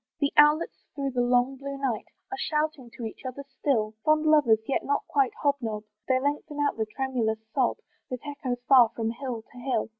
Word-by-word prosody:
The 285 -1 +1
owlets 300 +2 +4
through 275 -1 -2
the 245 -1 0
long 245 +2 +2
blue 275 +1 -6
night 260 -6 -2 0.2
Are - - -2
shouting 305 -7 -1
to 235 - -5
each 220 - -7
other 260 +2 -6
still: 220 -7 +1
Fond 310 0 +3
lovers, 295 -8 +5
yet 275 - 0
not 285 - 0
quite 275 -3 +2
hob 285 -1 +3
nob, 215 -2 -3 0.2
They 260 -1 +3
lengthen 290 +2 -2
out 290 - +1
the 220 -1 -2
tremulous 235 -2 -1 0.2
sob, 260 -3 +2 0.3
That 255 -2 -6
echoes 270 -4 -4
far 250 -4 +7
from 225 -1 -1
hill 235 -2 -5
to 250 - -18
hill. 245 -3 -1
265 Hz, 200 wpm, -27 LUFS, 240-285 Hz, 0.3 s, far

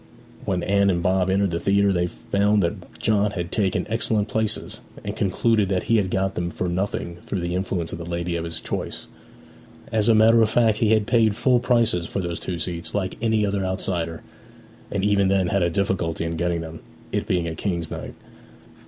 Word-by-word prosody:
When 90 -2 -1
Anne 100 0 +3
and 85 -2 0
Bob 95 0 +2
entered 95 0 +2
the 85 - -1
theatre 100 +1 +3
they 90 -1 +1
found 100 +3 +1
that 85 - -4
John 105 -1 +2
had 85 -4 -5
taken 100 -3 0
excellent 110 -1 +1
places, 110 0 -1 0.2
and 100 0 -4
concluded 105 0 +1
that 95 -2 0
he 115 - +2
had 100 -3 +1
got 95 +1 0
them 85 0 -2
for 90 - -3
nothing 85 -1 -2
through 95 - -2
the 85 0 -2
influence 90 -2 -2
of 85 - -5
the - - -5
lady 85 0 -2
of 85 - -2
his 85 -1 -4
choice. - - -4 0.9
As 110 0 +2
a 115 - +6
matter 115 +1 +6
of 110 - +3
fact 110 -2 +3
he 110 -1 +3
had 110 -2 +2
paid 110 -3 +3
full 125 +1 +3
prices 115 -8 +2
for - - -3
those 85 -2 -3
two 90 - -4
seats, 85 +2 -3
like 95 -2 -1
any 110 -2 +2
other 100 -1 -1
outsider, 90 -3 -2 0.7
and 100 -1 -1
even 100 -1 +3
then 95 -1 +2
had 100 +1 +1
a 85 - +2
difficulty 85 -3 -1
in 80 0 -3
getting 85 0 -1
them, 80 0 -8 0.3
it - - -2
being 90 -2 0
a 80 - -3
King's 85 -2 -3
night. - - -6
95 Hz, 205 wpm, -23 LUFS, 85-105 Hz, 0.9 s, a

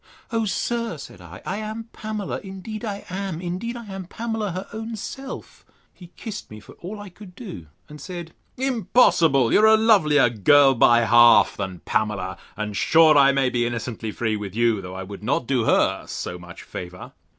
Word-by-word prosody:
O 225 -1 0
sir, 230 -2 -2
said 140 - -11
I, 90 +1 -12
I 195 - -3
am 215 +1 -5
Pamela, 215 -2 -4
indeed 195 +3 -8
I 205 -3 -5
am: 185 -2 -4
indeed 185 +7 -4
I 235 - -9
am 195 -2 -7
Pamela, 225 +1 -4
her 185 +3 -6
own 225 +1 -5
self! 270 +6 -8 0.3
He 180 - -14
kissed 215 -3 -7
me 110 - -10
for - - -15
all 205 +5 -7
I 205 -1 -9
could 180 0 -14
do; 185 - -9 0.2
and 150 0 -12
said, 175 -3 -8 0.2
Impossible! 205 - +3
you - - +6
are 220 - +6
a 220 0 +7
lovelier 155 - +4
girl 135 +6 +5
by 120 -1 +5
half 120 +1 +6
than 95 -3 -5
Pamela; 105 -2 -2 0.2
and 105 -1 -4
sure 160 - +5
I 140 -1 +6
may 135 -2 +1
be 120 -1 0
innocently 115 -1 -4
free 110 0 -1
with 105 -2 -6
you, 115 -3 +2
though 90 0 -8
I 95 - -5
would 100 +1 -9
not 125 +2 0
do 125 -3 0
her - - +2
so 90 - -5
much 90 -1 -11
favour. 90 0 -9
165 Hz, 190 wpm, -23 LUFS, -, 0.3 s, a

